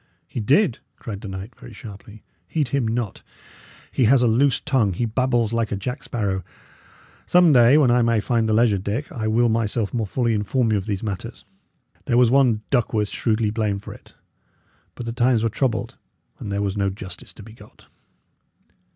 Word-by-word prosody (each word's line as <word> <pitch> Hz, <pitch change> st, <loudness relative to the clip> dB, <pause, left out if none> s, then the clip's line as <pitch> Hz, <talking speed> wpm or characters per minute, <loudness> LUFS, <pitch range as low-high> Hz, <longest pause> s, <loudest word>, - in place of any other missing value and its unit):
"He -, -, -6 dB
did?" 135 Hz, -, +2 dB, 0.2 s
cried 105 Hz, -3 st, -7 dB
the -, -, -7 dB
knight, 95 Hz, +4 st, -7 dB
very -, -, -13 dB
sharply. 105 Hz, +1 st, -12 dB, 0.2 s
"Heed 145 Hz, -, -1 dB
him 135 Hz, -2 st, 0 dB
not. 115 Hz, -2 st, -3 dB, 0.7 s
He 130 Hz, -, +2 dB
has 125 Hz, +2 st, +5 dB
a -, -, +4 dB
loose 125 Hz, +4 st, +3 dB
tongue; 115 Hz, -8 st, +1 dB
he 120 Hz, +7 st, -1 dB
babbles 120 Hz, -1 st, 0 dB
like 115 Hz, -1 st, -1 dB
a -, -, 0 dB
jack 125 Hz, +6 st, -5 dB
sparrow. 100 Hz, -5 st, -2 dB, 0.8 s
Some 175 Hz, -3 st, +5 dB
day, 125 Hz, +2 st, +6 dB
when 135 Hz, -5 st, +4 dB
I 125 Hz, 0 st, +4 dB
may 115 Hz, -1 st, +2 dB
find 115 Hz, +1 st, 0 dB
the -, -, +2 dB
leisure, 110 Hz, -3 st, +3 dB
Dick, 105 Hz, +10 st, -4 dB
I 110 Hz, -3 st, -3 dB
will 115 Hz, +2 st, +3 dB
myself 110 Hz, -1 st, 0 dB
more 115 Hz, -4 st, -1 dB
fully 120 Hz, +2 st, 0 dB
inform 110 Hz, +3 st, 0 dB
you 105 Hz, -, +2 dB
of 95 Hz, -, -8 dB
these 100 Hz, -1 st, -3 dB
matters. 100 Hz, -4 st, -6 dB, 0.6 s
There 120 Hz, -, +1 dB
was 120 Hz, -2 st, +5 dB
one 125 Hz, -5 st, +3 dB
Duckworth 110 Hz, -5 st, +1 dB
shrewdly 110 Hz, -2 st, 0 dB
blamed 105 Hz, -3 st, -2 dB
for -, -, -8 dB
it; -, -, -18 dB, 0.8 s
but 120 Hz, -, -7 dB
the 115 Hz, -, -4 dB
times 120 Hz, -1 st, +2 dB
were 115 Hz, -, +2 dB
troubled, 115 Hz, 0 st, -2 dB, 0.4 s
and 100 Hz, -, -6 dB
there 100 Hz, +1 st, -1 dB
was 100 Hz, -1 st, -2 dB
no 100 Hz, -1 st, 0 dB
justice 95 Hz, -1 st, -9 dB
to 105 Hz, -, -12 dB
be 110 Hz, +1 st, -13 dB
got." -, -, -18 dB
115 Hz, 195 wpm, -22 LUFS, 105-125 Hz, 0.8 s, day